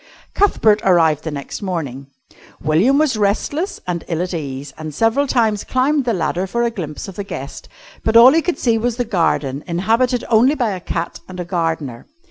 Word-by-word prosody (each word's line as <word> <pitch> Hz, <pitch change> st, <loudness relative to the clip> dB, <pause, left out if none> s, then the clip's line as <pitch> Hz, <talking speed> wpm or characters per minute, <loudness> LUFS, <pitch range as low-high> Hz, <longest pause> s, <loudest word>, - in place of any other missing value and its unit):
Cuthbert 220 Hz, -, +3 dB
arrived 165 Hz, -5 st, +3 dB
the -, -, -1 dB
next 145 Hz, +5 st, -6 dB
morning. 145 Hz, -9 st, -4 dB, 0.5 s
William 180 Hz, -, +3 dB
was 295 Hz, -6 st, +2 dB
restless 255 Hz, -, -1 dB
and 175 Hz, -2 st, -3 dB
ill 170 Hz, 0 st, -1 dB
at 180 Hz, -, -5 dB
ease, 140 Hz, -3 st, -5 dB
and 155 Hz, -2 st, -7 dB
several 230 Hz, -, +2 dB
times 220 Hz, -5 st, +1 dB
climbed 270 Hz, +2 st, +1 dB
the 240 Hz, -, +1 dB
ladder 175 Hz, +1 st, -1 dB
for 235 Hz, +5 st, -1 dB
a 235 Hz, -, +1 dB
glimpse 160 Hz, -8 st, -6 dB
of 195 Hz, -, -10 dB
the 200 Hz, -, -3 dB
guest, 140 Hz, -8 st, -8 dB, 0.3 s
but 225 Hz, +1 st, +4 dB
all 250 Hz, +3 st, +9 dB
he 330 Hz, -, +3 dB
could 355 Hz, +1 st, -2 dB
see 230 Hz, -2 st, +1 dB
was 240 Hz, +1 st, -1 dB
the 245 Hz, -, -1 dB
garden 160 Hz, -8 st, 0 dB
inhabited 225 Hz, +8 st, +1 dB
only 245 Hz, +6 st, +4 dB
by 240 Hz, -7 st, 0 dB
a 185 Hz, -, -4 dB
cat 170 Hz, -1 st, -4 dB
and 185 Hz, -1 st, -9 dB
a 180 Hz, -, -3 dB
gardener. 165 Hz, -8 st, -3 dB
195 Hz, 195 wpm, -19 LUFS, 160-235 Hz, 0.5 s, all